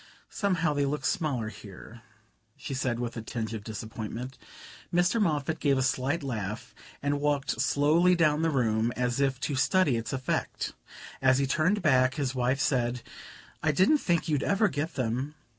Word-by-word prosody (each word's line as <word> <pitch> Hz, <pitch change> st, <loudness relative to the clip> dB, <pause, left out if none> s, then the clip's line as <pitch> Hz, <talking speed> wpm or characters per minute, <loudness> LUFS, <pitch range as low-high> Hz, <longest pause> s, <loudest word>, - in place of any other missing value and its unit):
"Somehow 185 Hz, -7 st, +1 dB
they 145 Hz, -1 st, +1 dB
look 150 Hz, +2 st, -2 dB
smaller 130 Hz, -10 st, 0 dB
here," 105 Hz, +2 st, -12 dB, 0.6 s
she -, -, -6 dB
said 130 Hz, -2 st, -1 dB
with 120 Hz, -1 st, -3 dB
a 115 Hz, -, -4 dB
tinge 110 Hz, 0 st, -4 dB
of 110 Hz, -2 st, -5 dB
disappointment. 110 Hz, +4 st, -6 dB, 0.6 s
Mr. 180 Hz, +6 st, +2 dB
Moffatt 155 Hz, -4 st, 0 dB
gave 140 Hz, -2 st, +2 dB
a 130 Hz, -, +1 dB
slight 135 Hz, +5 st, 0 dB
laugh 110 Hz, -2 st, -4 dB, 0.3 s
and 145 Hz, 0 st, 0 dB
walked 145 Hz, -1 st, 0 dB
slowly 165 Hz, +5 st, +4 dB
down 155 Hz, -3 st, +3 dB
the 165 Hz, -, +2 dB
room, 115 Hz, -5 st, +1 dB
as 125 Hz, +1 st, -1 dB
if 135 Hz, -2 st, +1 dB
to 145 Hz, -, -1 dB
study 145 Hz, 0 st, +3 dB
its 115 Hz, -, -4 dB
effect. 130 Hz, -1 st, -2 dB, 0.5 s
As 130 Hz, -1 st, +4 dB
he 140 Hz, -, +2 dB
turned 170 Hz, +9 st, +1 dB
back 130 Hz, -4 st, +4 dB
his 140 Hz, -4 st, -1 dB
wife 130 Hz, +1 st, 0 dB
said: 125 Hz, -3 st, 0 dB, 0.6 s
"I 155 Hz, -, +2 dB
didn't 190 Hz, -, +4 dB
think 170 Hz, -8 st, 0 dB
you'd 150 Hz, -3 st, +1 dB
ever 200 Hz, +4 st, +2 dB
get 155 Hz, +1 st, -3 dB
them." 130 Hz, +4 st, -2 dB
135 Hz, 170 wpm, -28 LUFS, 120-155 Hz, 0.6 s, slowly